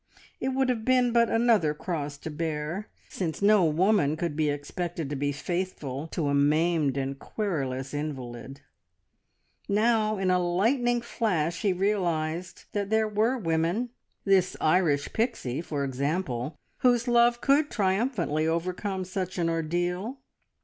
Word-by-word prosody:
It - - -2
would 265 0 +1
have 230 -3 0
been 250 0 +3
but 235 -1 +4
another 225 -10 +3
cross 150 -4 -4
to 160 - -7
bear, 160 +5 -3 0.2
since 165 -5 -3
no 205 -1 +5
woman 160 -1 +2
could 165 -2 -2
be 155 -1 +1
expected 150 +2 -4
to - - -1
be 145 +1 0
faithful 155 -3 -3
to 160 -2 -2
a 140 - +1
maimed 150 0 +2
and 135 0 -3
querulous 135 -12 -3
invalid. 135 -2 -5 1.1
Now 215 +1 +2
in 190 -1 +1
a 180 - +3
lightning 235 +8 +1
flash 180 -9 -1
he 205 -3 +2
realised 175 -3 -1
that 200 -1 -2
there 220 0 +2
were 220 +5 +1
women 175 +5 0 0.3
this 190 -2 +3
Irish 155 -4 +2
Pixie, 220 - -1
for 145 -4 -3
example 140 0 -2 0.2
whose 245 -1 +3
love 240 0 +4
could 290 +3 +3
triumphantly 190 - 0
overcome 185 +3 -2
such 185 0 -4
an 170 -1 +1
ordeal. 175 - -1
175 Hz, 140 wpm, -27 LUFS, 150-215 Hz, 1.1 s, no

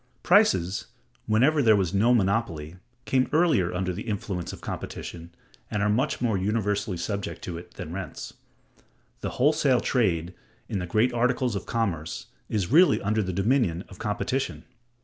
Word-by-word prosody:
Prices, 95 - +3 0.4
whenever 135 +8 +4
there 110 -4 +6
was 95 -2 0
no 110 +5 +4
monopoly, 95 -7 0 0.3
came 130 -1 +2
earlier 155 - +3
under 90 0 -2
the 105 +6 -7
influence 95 -4 -3
of - - -9
competition, 85 0 -6 0.4
and 105 -1 -1
are 105 - +2
much 130 +7 0
more 110 -6 +1
universally 105 -1 -1
subject 100 +3 -4
to 85 -2 -5
it, 85 - -15
than 80 - -7
rents. 95 -4 -6 0.9
The - - -3
wholesale 140 -2 +3
trade, 90 -10 0 0.3
in 100 - -2
the 90 - -4
great 110 +7 +2
articles 125 -1 +1
of 100 - -5
commerce, 95 -9 -2 0.2
is 105 -3 -1
really 165 0 +6
under 105 +2 +1
the 95 -2 -2
dominion 100 -3 +1
of 95 - -13
competition. 125 +5 -2
105 Hz, 155 wpm, -26 LUFS, 90-125 Hz, 0.9 s, there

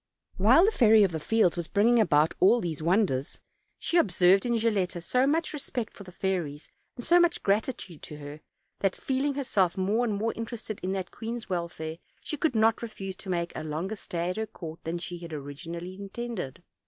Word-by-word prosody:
While 245 - +6
the 430 - +3
Fairy 220 - +6
of 190 - +2
the 160 - -3
Fields 215 0 +2
was 170 -2 -3
bringing 230 +4 +4
about 155 -7 +4
all 215 +6 +6
these 165 -7 -3
wonders, 170 -6 +1 0.4
she 345 - 0
observed 190 - +4
in 235 - +1
Gilletta 205 -6 0
so 250 +10 +1
much 315 +3 +1
respect 250 -6 -4
for 200 - -11
the 185 - -12
fairies, 175 -6 -2 0.3
and 245 - -7
so 350 +1 +6
much 345 -1 +2
gratitude 200 - -1
to 150 - -9
her, 145 +1 -9 0.4
that, 195 -2 +1
feel 265 +1 -1
ing 285 -1 0
herself 210 -11 +1
more 205 +5 +1
and 220 -4 0
more 220 +3 -1
interested 225 -2 -5
in 185 +1 -2
that 190 -2 -4
queen's 230 -2 -6
wel 170 -1 -1
fare, 160 0 -6 0.2
she - - -3
could 305 -4 0
not 220 +1 +3
refuse 195 -5 -6
to 195 - -9
make 170 -1 -1
a 155 - -4
longer 160 +7 -3
stay 175 -3 -3
at 185 - -6
her 220 0 -2
oourt 165 -6 -8
than 165 +2 -2
she 175 0 -6
had 170 -2 -8
originally 165 +5 -6
intended. 195 - -6
195 Hz, 205 wpm, -28 LUFS, 170-230 Hz, 0.4 s, While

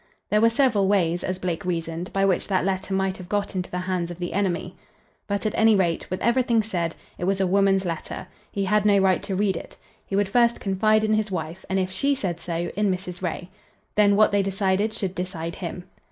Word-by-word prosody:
There 210 - +4
were 230 - +6
several 230 -5 +2
ways, 175 -3 +2
as 185 0 -2
Blake 180 -1 -3
reasoned, 170 -1 -3
by 195 0 +2
which 190 -2 +1
that 185 -2 +1
letter 190 0 -2
might 190 0 0
have 180 -2 -10
got 205 0 -1
into 185 -1 -2
the 180 - -4
hands 180 -1 -2
of 175 - -7
the 175 -1 -4
enemy. 185 -2 -1 0.5
But 200 +1 -2
at 215 - 0
any 220 -1 +5
rate, 175 -4 0
with 185 - -3
everything 235 -2 +3
said, 175 -6 -2 0.2
it 175 - -2
was 195 +1 +1
a 190 - +3
woman's 195 0 +3
letter. 165 -2 -4 0.3
He 200 -1 -1
had 210 +2 +2
no 205 -1 +5
right 190 -1 +3
to 195 - -3
read 195 -1 +1
it. - - -8 0.3
He 195 - -4
would 200 0 +2
first 235 +2 +3
confide 215 +2 +2
in 215 0 +2
his 215 -1 +1
wife, 170 0 -5
and, 190 - +1
if 185 -1 0
she 280 +8 +1
said 180 -9 -3
so, 170 0 -3
in 205 0 +2
Mrs. 180 -1 -5
Ray. 180 0 -4 0.4
Then 205 -1 +4
what 215 +1 +5
they 200 0 +3
decided 195 +2 0
should 195 -4 -3
decide 175 -3 -4
him. 180 0 -5
190 Hz, 225 wpm, -24 LUFS, 180-205 Hz, 0.5 s, were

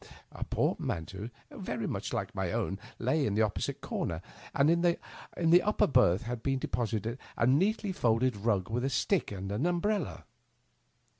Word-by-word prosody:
A - - -4
portmanteau, 95 +7 -2 0.2
very - - -4
like - - -3
my - - -1
own, 95 - -1 0.2
lay 130 +6 +1
in 105 -6 0
the 110 - +4
opposite 105 -3 -2
comer, 85 0 -3 0.3
and 140 - +3
in 170 0 +3
the 170 0 +2
upper 210 - +3
berth 125 -6 +4
had 120 -1 -4
been 135 +1 +1
deposited 115 -1 -2 0.2
a - - +3
neatly 190 - +2
folded 125 -5 +2
rng 100 -2 0
with 120 +2 0
a 135 - +1
stick 155 - +1
and 95 -1 -5
umbrella. 175 - 0
125 Hz, 150 wpm, -31 LUFS, 105-165 Hz, 0.3 s, the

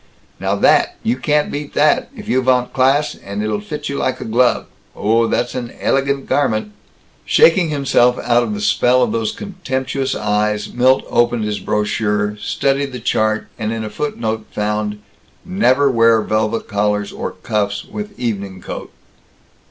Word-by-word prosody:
"Now - - 0
that 360 - +3
you 235 +2 +1
can't 150 -6 0
beat 145 0 -6
that, 150 0 +3
if 210 -1 -9
you 130 - +2
vant 125 -1 +1
class, 135 +3 +2
and 100 +1 -6
it'll 105 -1 -1
fit 150 +8 -6
you 140 - -3
like 130 - -1
a - - -6
glove. 120 +2 +2 0.3
Oh, 115 +3 +2
that's 120 +1 -1
an 120 -2 -4
ellllegant 140 0 0
garment!" 110 -7 0 0.5
Shaking 170 0 +4
himself 130 -4 +2
out 120 0 +2
of 110 -3 -2
the 105 - -5
spell 125 +4 +3
of 120 - 0
those 115 -1 -1
contemptuous 135 -9 -3
eyes 105 0 -1
Milt 130 +2 +3
opened 120 -1 +1
his 105 -1 -2
brochure, 105 0 0
studied 135 +3 0
the 125 - -5
chart, 110 -1 0
and 110 -1 -2
in 115 -1 -3
a 110 - -5
footnote 110 -3 -3
found, 105 0 -2 0.5
"Never 145 -8 +3
wear 115 -2 +4
velvet 110 +1 -1
collars 105 0 0
or - - -5
cuffs 105 -1 -2
with 210 -1 -7
evening 100 -6 -3
coat." - - -7
120 Hz, 160 wpm, -18 LUFS, 105-135 Hz, 0.5 s, Shaking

